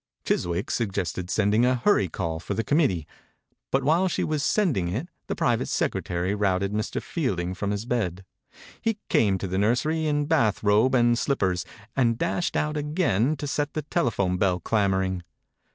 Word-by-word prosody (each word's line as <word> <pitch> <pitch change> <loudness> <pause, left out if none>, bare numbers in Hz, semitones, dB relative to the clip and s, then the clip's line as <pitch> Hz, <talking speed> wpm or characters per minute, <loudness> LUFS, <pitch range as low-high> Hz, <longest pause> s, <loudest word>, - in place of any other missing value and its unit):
Chiswick 90 +5 -1
suggested 95 -5 -2
sending 105 +3 +2
a 125 +1 +3
hurry 120 - +2
call 80 0 -3
for 80 - -4
the 115 - 0
committee, 110 - +1 0.6
but 135 0 +1
while 165 +7 +3
she 180 - -1
was 155 -2 -1
sending 150 - +1
it 110 - -3 0.2
the - - -2
private - - +1
secretary 90 +2 -1
routed 100 -1 0
Mr. 110 +1 -2
Fielding 90 - -2
from 100 +2 -3
his 105 +2 -2
bed. 95 -7 -2 0.6
He 225 -2 0
came 100 -4 +3
to 95 - -4
the 95 +1 -1
nursery 155 +9 +1
in 145 -1 +1
bath 120 -11 +1
robe 105 +6 +4
and 120 -1 +4
slippers, 95 -10 0 0.3
and 115 -4 +2
dashed 170 +4 -1
out 150 0 -1
again 150 - +1
to 145 - -5
set 145 +1 -2
the 155 - -3
telephone 100 - 0
bell 90 -1 +1
clamoring. 95 -2 0
110 Hz, 170 wpm, -25 LUFS, 95-145 Hz, 0.6 s, robe